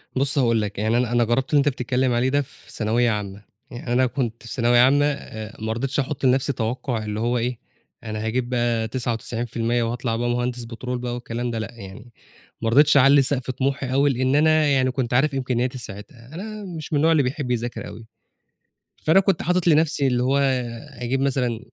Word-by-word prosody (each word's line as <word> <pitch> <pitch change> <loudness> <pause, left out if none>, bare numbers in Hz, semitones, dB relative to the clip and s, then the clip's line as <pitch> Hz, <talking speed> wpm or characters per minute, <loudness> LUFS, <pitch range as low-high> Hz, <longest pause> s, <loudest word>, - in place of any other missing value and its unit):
بُصّ 135 +2 +2
هاقول 115 -4 +3
لك 105 -1 -4
يعني 110 +2 +1
أنا 125 -1 0
أنا 120 0 +3
جرّبت 120 +3 0
اللي 145 - +5
أنت 145 +1 +3
بتتكلّم 125 -1 0
عليه 120 +2 +1
ده 145 +2 +2
في 135 - -13
ثانوية 115 +2 +1
عامة، 100 -1 -5 0.3
يعني 120 0 -4
أنا 130 +1 +4
كنت 120 -3 -3
في 115 - -7
ثانوية 120 -2 +3
عامة 140 +4 +5
آآ 110 -7 -5
ما 110 0 -1
رضيتش 135 +5 -2
أحط 135 0 -2
لنفْسي 130 +2 +2
توقع 115 0 -2
اللي 105 0 -3
هو 120 +2 0
إيه، 120 0 -2 0.4
أنا 110 -1 -4
هاجيب 120 +2 -1
بقى 120 -2 0
99% 120 0 -2
وهاطلع 115 0 -2
بقى 120 +1 -1
مهندس 120 0 -1
بترول 125 +2 -5
بقى 120 0 -4
والكلام 120 0 -4
ده 115 - -3
لأ 110 - -5
يعني، 105 +3 -11 0.5
ما 115 - 0
رضيتش 140 +5 +5
أعلِّي 140 +1 +6
سقف 130 -1 0
طموحي 135 0 -2
أوي، 140 +2 +3
لإن 130 +1 +1
أنا 155 0 +4
يعني 130 -2 +2
كنت 125 -2 -2
عارف 140 +4 +3
إمكانياتي 130 -1 -1
ساعتها، 115 +3 -10
أنا 215 +3 -6
مش 155 +1 -7
من - - +3
النوع 160 +3 +3
اللي 155 -3 +4
بيحب 130 0 -3
يذاكر 120 0 -3
أوي، 115 - -11 1.0
فأنا 160 +5 +5
كنت 195 -2 +1
حاطط 180 0 0
لنفْسي 155 -3 +3
اللي 125 -1 +1
هو 135 +2 +2 0.6
أجيب 125 +2 -1
مثلًا 125 -4 0
125 Hz, 200 wpm, -23 LUFS, 115-135 Hz, 1.0 s, أعلِّي